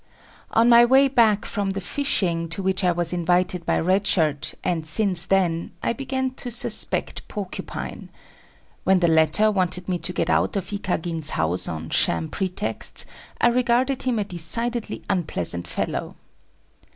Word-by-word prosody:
On 225 Hz, +1 st, +3 dB
my 235 Hz, 0 st, +7 dB
way 265 Hz, +3 st, +5 dB
back 225 Hz, -6 st, +2 dB
from 205 Hz, -2 st, -2 dB
the 195 Hz, 0 st, -3 dB
fishing 180 Hz, -, -1 dB
to 180 Hz, +4 st, -3 dB
which 190 Hz, +1 st, 0 dB
I 180 Hz, -, +3 dB
was 175 Hz, 0 st, -1 dB
invited 180 Hz, 0 st, 0 dB
by -, -, +2 dB
Red 190 Hz, +4 st, +1 dB
Shirt, 150 Hz, -4 st, +1 dB
and 170 Hz, -3 st, -1 dB
since 180 Hz, 0 st, +1 dB
then, 175 Hz, -4 st, 0 dB
I -, -, 0 dB
began 260 Hz, 0 st, -3 dB
to 250 Hz, -, -5 dB
suspect 235 Hz, -, +2 dB
Porcupine. 200 Hz, -3 st, -7 dB, 0.7 s
When 190 Hz, -1 st, +3 dB
the 175 Hz, -, +2 dB
latter 160 Hz, +7 st, +3 dB
wanted 185 Hz, -2 st, -1 dB
me 180 Hz, -2 st, -1 dB
to 170 Hz, +2 st, -2 dB
get 165 Hz, -2 st, -2 dB
out -, -, +1 dB
of 195 Hz, +1 st, -4 dB
Ikagin's 165 Hz, -5 st, -1 dB
house 85 Hz, +3 st, +1 dB
on 80 Hz, -1 st, -6 dB
sham 80 Hz, -1 st, +1 dB
pretexts, 190 Hz, +2 st, -1 dB, 0.3 s
I 240 Hz, -, +4 dB
regarded 250 Hz, +2 st, +1 dB
him 250 Hz, -3 st, -1 dB
a 210 Hz, -, 0 dB
decidedly 220 Hz, +6 st, -2 dB
unpleasant 90 Hz, -, -1 dB
fellow. -, -, -4 dB
185 Hz, 155 wpm, -23 LUFS, 165-225 Hz, 0.7 s, my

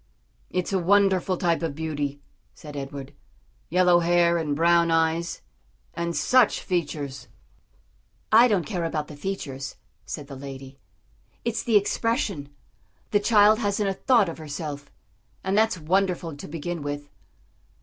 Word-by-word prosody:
"It's 180 Hz, +1 st, -2 dB
a 190 Hz, -, +2 dB
wonderful 190 Hz, 0 st, +3 dB
type 170 Hz, -2 st, +1 dB
of 160 Hz, -4 st, -2 dB
beauty," 145 Hz, -3 st, -3 dB, 0.3 s
said 150 Hz, -1 st, -11 dB
Edward; 140 Hz, -1 st, -6 dB, 0.6 s
"yellow 180 Hz, 0 st, +4 dB
hair 170 Hz, 0 st, +3 dB
and 150 Hz, -3 st, -1 dB
brown 170 Hz, +1 st, +4 dB
eyes, 165 Hz, -, 0 dB, 0.5 s
and 170 Hz, 0 st, -3 dB
such 255 Hz, -3 st, +3 dB
features." 145 Hz, -6 st, -3 dB, 1.0 s
"I 230 Hz, +3 st, +8 dB
don't 200 Hz, -8 st, +1 dB
care 175 Hz, +3 st, -3 dB
about 155 Hz, -2 st, -2 dB
the 150 Hz, -, -9 dB
features," 145 Hz, -5 st, -5 dB, 0.3 s
said 150 Hz, -, -5 dB
the 140 Hz, 0 st, -9 dB
lady, 135 Hz, 0 st, -9 dB, 0.7 s
"it's 235 Hz, -1 st, -1 dB
the 225 Hz, -3 st, +4 dB
expression; 205 Hz, -, -1 dB, 0.6 s
the 205 Hz, -, +4 dB
child 210 Hz, 0 st, +5 dB
hasn't 205 Hz, -2 st, 0 dB
a -, -, 0 dB
thought 230 Hz, 0 st, +3 dB
of 165 Hz, -, -6 dB
herself, 145 Hz, -2 st, -6 dB, 0.5 s
and 190 Hz, +1 st, 0 dB
that's 220 Hz, -2 st, +3 dB
wonderful 175 Hz, -1 st, 0 dB
to 145 Hz, -, -9 dB
begin 165 Hz, +2 st, -4 dB
with." 145 Hz, 0 st, -5 dB
170 Hz, 140 wpm, -25 LUFS, 145-195 Hz, 1.0 s, I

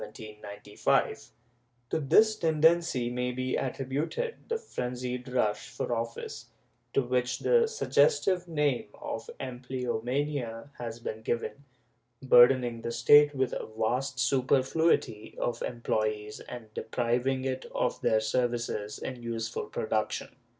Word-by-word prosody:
^ 105 Hz, -1 st, -2 dB, 0.6 s
To -, -, +1 dB
this 215 Hz, +10 st, +5 dB
tendency 160 Hz, -, +2 dB
may 125 Hz, 0 st, -1 dB
be 130 Hz, +1 st, -2 dB
attributed 140 Hz, -, -2 dB, 0.2 s
the 460 Hz, -, +1 dB
frenzied 125 Hz, -, -4 dB
rush 110 Hz, -5 st, 0 dB
for -, -, -3 dB
office, 115 Hz, 0 st, -5 dB, 0.5 s
to 135 Hz, -, +3 dB
which 125 Hz, 0 st, 0 dB
the 475 Hz, -1 st, +3 dB
suggestive 440 Hz, -, +2 dB
name 150 Hz, -8 st, 0 dB
of 115 Hz, -, -6 dB
empleomania 125 Hz, 0 st, -3 dB
has 115 Hz, -1 st, -5 dB
been 110 Hz, -1 st, -5 dB
given, 120 Hz, +5 st, -3 dB, 0.5 s
bur 125 Hz, -2 st, +8 dB
dening 120 Hz, -3 st, -2 dB
the 115 Hz, -, -3 dB
State 145 Hz, +5 st, +6 dB
with 130 Hz, -2 st, 0 dB
a -, -, -4 dB
vast 125 Hz, +4 st, 0 dB
superfluity 130 Hz, -1 st, +1 dB
of 120 Hz, -, -2 dB
employees 110 Hz, -3 st, -2 dB
and 115 Hz, -3 st, -9 dB
depriving 125 Hz, +4 st, -1 dB
it 130 Hz, 0 st, -2 dB
of 125 Hz, -, 0 dB
their 110 Hz, 0 st, +3 dB
services 120 Hz, -2 st, -1 dB
in 130 Hz, -2 st, -6 dB
useful 115 Hz, 0 st, -3 dB
production. 110 Hz, 0 st, -2 dB
125 Hz, 120 wpm, -29 LUFS, 115-140 Hz, 0.6 s, bur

